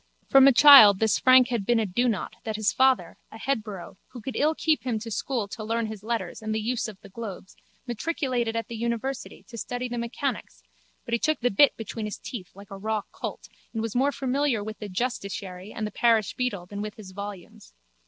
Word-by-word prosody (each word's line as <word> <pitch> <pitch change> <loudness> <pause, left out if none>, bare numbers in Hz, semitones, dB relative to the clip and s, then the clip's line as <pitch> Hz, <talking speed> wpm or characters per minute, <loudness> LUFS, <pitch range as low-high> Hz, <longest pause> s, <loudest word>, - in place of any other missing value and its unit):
From 270 0 +7
a - - +8
child 240 -6 +9
this 220 +1 +2
Frank 255 -1 +6
had 235 -5 -1
been 235 +3 +2
a 220 - +1
donought 215 +1 -1
that 220 -1 -3
his 215 +2 +1
father, 260 -11 +2
a 220 - -10
headborough, 210 -8 -4
who 250 - -11
could 250 +4 -6
ill 310 +2 +2
keep 315 -1 +1
him 245 -3 -2
to 225 +1 -7
school 230 -1 -2
to 215 +1 -7
learn 230 +1 -1
his 215 -2 -7
letters 230 +1 -4
and 215 0 -3
the - - 0
use 240 +2 -2
of 210 -3 -10
the 200 - -13
globes, 195 -2 -8 0.3
matriculated 245 -2 -2
at 230 -2 -2
the 235 - -7
university 235 +3 -4
to 230 - -10
study 245 +3 -4
the 240 -1 -4
mechanics 235 - -4 0.4
but 235 - -5
he 235 - +2
took 310 +4 0
the 245 - +2
bit 280 +9 +5
between 225 0 -5
his 210 - -5
teeth 195 -8 -8
like 200 0 -14
a 195 - -7
raw 215 +1 -2
colt - - -7 0.3
and 225 -1 -2
was 225 -2 -3
more 270 +3 +3
familiar 265 -4 0
with 215 +1 -7
the 210 - -6
justiciary 195 -3 -4
and 220 - -4
the 210 - -5
parish 225 -3 +2
beadle 225 -8 -3
than 200 +3 -7
with 210 +1 -5
his 210 -5 -11
volumes. 200 - -9
225 Hz, 220 wpm, -26 LUFS, 205-250 Hz, 0.4 s, child